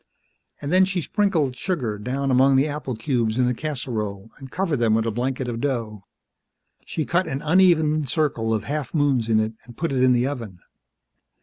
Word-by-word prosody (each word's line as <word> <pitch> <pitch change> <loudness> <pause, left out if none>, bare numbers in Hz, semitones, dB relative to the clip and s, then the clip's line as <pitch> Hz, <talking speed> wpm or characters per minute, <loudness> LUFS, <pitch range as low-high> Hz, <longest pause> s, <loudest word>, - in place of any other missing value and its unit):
And 145 +3 -3
then 185 +1 +6
she 190 -1 0
sprinkled 170 - 0
sugar 125 - -2
down 135 +5 -2
among 135 +2 +5
the 135 +3 +3
apple 145 -4 -4
cubes 115 -2 -1
in 125 - +3
the 125 - +1
casserole 115 -8 -4
and 135 -1 -10
covered 175 -1 -1
them 115 -2 +3
with 110 0 +1
a 115 - 0
blanket 125 +3 -2
of 115 -1 -4
dough. 115 -8 -3 0.8
She 155 - -2
cut 175 +2 +1
an 135 +1 -4
uneven 155 -3 +3
circle 120 -5 0
of 110 -2 0
half 145 +6 -4
moons 135 -6 +2
in 110 -1 +4
it 110 +1 -1
and 120 -1 -14
put 165 -1 -2
it 130 -2 0
in 130 0 +5
the 120 0 +2
oven. 115 -9 -5
130 Hz, 195 wpm, -23 LUFS, 115-150 Hz, 0.8 s, then